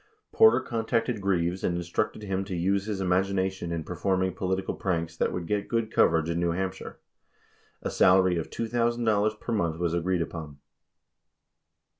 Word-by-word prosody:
53 - - -21
Porter, 445 0 +7
contacted 115 -1 -1
Greaves 90 -2 0
and 85 - 0
instructed 85 +4 -2
him 95 -1 -2
to 95 -2 -4
use 95 +4 0
his 105 -3 -2
imagina 95 +1 +1
tion 90 -3 -6
in 85 -1 -2
performing 95 +2 -1
political 95 0 -2
pranks 85 -3 -2
that - - 0
would 90 -2 -4
get 105 +2 -1
good 115 -2 -1
coverage 80 -1 +3
in 85 0 -1
New 85 -1 +1
Hampshire. 95 +1 -4 0.9
54 - - -1
A - - -3
salary 95 -1 +4
of 80 - -3
$2,000 115 -2 0
per - - -5
month 85 -7 0
was 85 -1 -1
agreed 85 0 0
upon. 80 -4 -8
95 Hz, 170 wpm, -27 LUFS, 85-105 Hz, 0.9 s, Porter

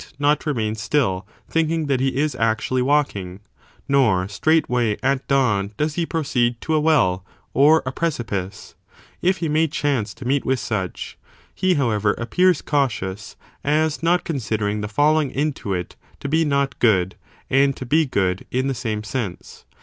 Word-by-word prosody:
not 145 +2 +1
remain 110 -7 0
still, 110 -4 -1 0.2
thinking 160 0 0
that 135 -3 +1
he 135 0 0
is 150 +1 +1
actually 115 +3 0
walking) 125 -10 0 0.5
nor 110 -10 +3
straightway, 125 -3 +1
at 135 0 0
dawn, 105 -7 +1
does 150 0 0
he 170 0 -1
proceed 120 -7 0
to 160 - -2
a 155 - +3
well 130 - +2 0.3
or 150 +4 +5
a 130 - -2
precipice 105 - -3 0.5
1 180 - +2
if 190 - +1
he 165 - -2
may 155 +2 +2
chance 135 -8 -1
to 130 - -10
meet 135 +2 +1
with 130 -1 0
such, 105 -5 -4 0.3
he, 185 -1 +1
however, 110 -7 +1
appears 180 +8 +1
cautious, 110 -9 -2 0.3
as 155 +1 +1
not 175 +2 +2
considering 105 -7 -2
the 105 - -3
felling 150 +6 +2
into 140 -6 -2
it 90 -2 -3 0.2
to - - -5
be 160 +3 +2
not 140 -3 0
good 95 -6 +3 0.4
and 135 0 +3
to 130 - -6
be 155 +6 +3
good 95 -9 -1
in 130 +1 -1
the 135 - 0
same 110 -4 -3
sense. 105 -4 -5
130 Hz, 165 wpm, -22 LUFS, 105-150 Hz, 0.5 s, or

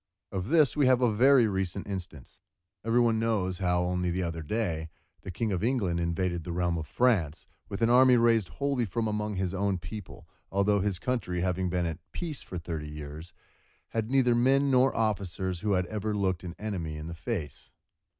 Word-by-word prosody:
Of 95 -1 -3
this 155 -2 +4
we 145 -3 +3
have 130 -1 +5
a 120 -3 +2
very 130 +2 +5
recent 95 -2 -2
instance. 90 -9 -8 0.4
Every 115 +2 +2
one 115 -2 +3
knows, 100 -6 0
how, 90 -2 +1
only 90 0 -1
the 90 +2 -1
other 85 -1 -3
day, 80 -2 -2 0.3
the - - -8
King 110 +4 -2
of 95 -1 -1
England 110 -9 +1
invaded 85 0 -1
the 85 - -5
realm 85 -1 0
of 80 - -6
France 90 - +1 0.2
with 100 +3 -3
an 115 - +4
army 125 0 +6
raised 115 -4 +3
wholly 125 - -1
from 110 +3 -2
among 105 -1 -2
his 95 -1 -1
own 100 0 0
people, 90 +3 -9 0.2
although 100 +1 +2
from 100 - 0
his 95 -3 -1
country 90 -4 -2
having 90 0 0
been 90 0 0
at 80 -1 -3
peace 160 -6 -4
for 90 - -7
thirty 80 -3 -5
years, 75 +3 -8
he - - -42 0.5
had 110 -1 -2
neither 130 -2 +3
men 135 +4 +3
nor 130 +1 +4
officers 95 -4 -1
who 105 +2 0
had 90 -1 +1
ever 105 +1 -3
looked 95 -3 0
an 90 -1 -7
enemy 90 -8 -4
in 75 - -7
the 85 - -6
face. 85 - -5
95 Hz, 200 wpm, -29 LUFS, 85-115 Hz, 0.5 s, army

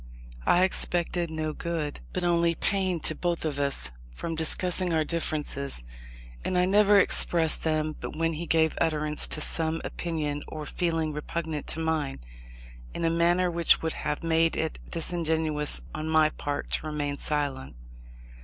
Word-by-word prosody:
I 180 - +5
expected 175 -2 +1
no 155 -1 -3
good, 160 -3 -3
but 185 - -3
only 170 -1 +2
pain 185 -1 0
to 155 - 0
both 170 +1 -2
of 145 -2 -2
us, 140 - -1 0.2
from 165 - -4
discussing 175 +3 +2
our 160 -1 +2
differences: 150 - -3 0.6
and 180 - -1
I 180 - +4
never 205 +1 +5
expressed 165 -3 +3
them 155 -1 0
but - - -6
when 165 0 +1
he 165 +2 -5
gave 160 -1 +2
utterance 155 -2 +2
to - - +2
some 160 +1 +2
opinion 150 -4 -3
or 155 -1 -6
feeling 165 -2 -1
repugnant 155 0 -4
to - - -1
mine, 160 - -1 0.8
in 170 - -1
a 165 - +2
manner 175 +2 +2
which 170 -1 +3
would 160 - -1
have 150 - -3
made 165 0 +2
it 160 -1 -2
disingenuousness 160 -3 0
on 155 +1 -4
my 155 -1 +4
part 145 -1 -5
to 155 - 0
remain 145 -2 -3
silent. 140 - -1
160 Hz, 155 wpm, -27 LUFS, 150-170 Hz, 0.8 s, I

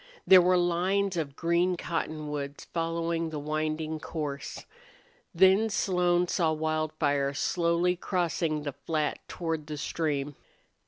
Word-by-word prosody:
There 185 -1 +9
were 180 +1 +4
lines 180 +3 +1
of 150 -5 -3
green 170 +2 +1
cottonwoods 150 -4 -4
following 165 0 -1
the 155 - -5
winding 155 +1 -2
course. 150 -3 -5 0.7
Then 190 +5 +5
Slone 180 -3 +2
saw 165 -2 +1
Wildfire 155 -3 0
slowly 170 +3 +1
crossing 170 -4 -1
the 145 -2 -4
flat 155 0 -2
toward 165 -3 -3
the 150 -1 -5
stream. 145 -1 -2
165 Hz, 115 wpm, -28 LUFS, 150-175 Hz, 0.7 s, There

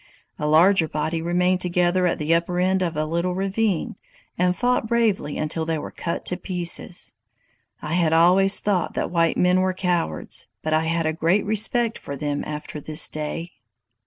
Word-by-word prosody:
A 150 - -1
larger 165 +3 +4
body 155 +2 -2
remained 180 +2 +1
together 180 +1 +1
at 170 - 0
the 155 +2 0
upper 170 +1 0
end 185 +1 +1
of 170 -4 -2
a 155 - 0
little 170 +3 -1
ravine, 195 -1 -1 0.4
and 180 0 +1
fought 245 0 0
bravely 215 -10 0
until 155 +1 -1
they 160 0 -1
were 150 - -6
cut 170 - -4
to 180 - -1
pieces. 180 -1 -1 0.7
I 150 - -3
had 170 -2 +2
always 185 +4 +5
thought 195 -4 -1
that - - -2
white 165 -1 +1
men 180 +1 +3
were 185 0 0
cowards, 175 - -2 0.2
but 155 - -1
I 160 +1 +2
had 165 0 0
a 155 - 0
great 170 +5 +1
respect 220 +2 +1
for 140 - -7
them 145 +1 -3
after 150 0 -6
this 155 +2 +2
day. 155 +3 -5
175 Hz, 180 wpm, -23 LUFS, 160-185 Hz, 0.7 s, always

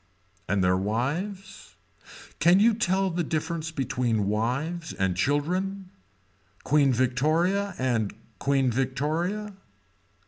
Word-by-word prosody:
And 100 -1 +2
their 90 0 +3
wives. 150 - -3 0.6
Can 175 +3 +5
you 225 +2 +5
tell 195 -3 +1
the 175 +1 -1
difference 160 +1 -2
between 120 -8 -1
wives 135 +11 -2
and 95 -2 0
children. 180 - -1 0.7
Queen 145 -1 +3
Victoria 155 - +1
and 120 -5 0 0.3
Queen 135 -2 +2
Victoria. 155 - -1
150 Hz, 100 wpm, -26 LUFS, 125-180 Hz, 0.7 s, Can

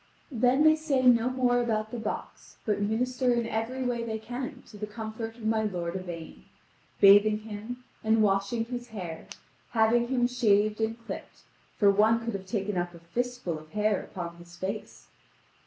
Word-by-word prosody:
Then 250 +3 +3
they 310 0 +7
say 300 -4 0
no 240 -1 +5
more 250 -1 +2
about 220 -2 -1
the 240 - -4
box, 220 - -6
but 210 -2 0
minister 250 +4 +1
in 235 -1 0
every 230 +4 -2
way 245 -2 -1
they 220 -1 -3
can 250 +4 -6
to 215 - -13
the 210 - -3
comfort 220 +1 -6
of 225 - -9
my 220 0 +2
lord 180 -5 -2
Yvain, 165 - -7 0.5
bathing 205 +2 +7
him 220 +3 -7 0.2
and 220 0 +4
washing 200 +3 +1
his 245 0 -5
hair, 180 -8 -7 0.5
having 235 +1 +3
him 245 -1 +2
shaved 215 -3 +2
and 225 +1 0
clipped, - - -8 0.3
for 200 -2 +6
one 220 +3 +3
could 230 - -2
have 190 -1 -5
taken 195 -2 -1
up 175 0 -3
a - - -12
fist 245 +9 -3
full 165 -3 -2
of 155 0 -16
hair 210 -1 +1
upon 170 -2 -7
his 170 0 -14
face. 195 +4 -5
220 Hz, 180 wpm, -28 LUFS, 200-245 Hz, 0.5 s, they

